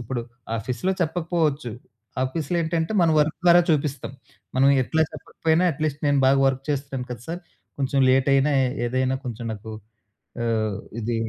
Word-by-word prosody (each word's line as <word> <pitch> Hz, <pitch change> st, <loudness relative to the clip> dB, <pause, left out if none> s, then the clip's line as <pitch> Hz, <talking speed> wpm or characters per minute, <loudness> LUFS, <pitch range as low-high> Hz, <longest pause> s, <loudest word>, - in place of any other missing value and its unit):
ఇప్పుడు 120 Hz, +1 st, -3 dB, 0.4 s
ఆఫీస్‌లో 125 Hz, -, -2 dB
చెప్పకపోవచ్చు. 160 Hz, -6 st, 0 dB, 0.5 s
ఆఫీస్‌లో 155 Hz, +5 st, -2 dB
ఏంటంటే 165 Hz, +3 st, -1 dB
మనం 165 Hz, -1 st, +4 dB
వర్క్ 150 Hz, +1 st, +1 dB
ద్వారా 175 Hz, 0 st, +7 dB
చూపిస్తాం. 145 Hz, -3 st, -1 dB, 0.4 s
మనం 135 Hz, +1 st, +5 dB
ఎట్లా 160 Hz, +5 st, +1 dB
చెప్పకపోయినా 160 Hz, +2 st, 0 dB
అట్లీస్ట్ 150 Hz, 0 st, -3 dB
నేను 140 Hz, -1 st, +3 dB
బాగా 135 Hz, +1 st, +4 dB
వర్క్ 135 Hz, 0 st, -2 dB
చేస్తున్నాను 135 Hz, -3 st, -3 dB
కదా! 120 Hz, -, -9 dB
సార్ 175 Hz, +2 st, -4 dB, 0.4 s
కొంచెం 135 Hz, 0 st, 0 dB
లేట్ 130 Hz, +1 st, +3 dB
అయినా 140 Hz, +2 st, +3 dB, 0.3 s
ఏదైనా 130 Hz, +1 st, 0 dB
కొంచెం 120 Hz, -1 st, -5 dB
నాకు 110 Hz, +1 st, -8 dB, 0.7 s
ఆహ్, 110 Hz, -3 st, 0 dB, 0.2 s
ఇది 115 Hz, +1 st, -2 dB
140 Hz, 145 wpm, -24 LUFS, 125-160 Hz, 0.7 s, ద్వారా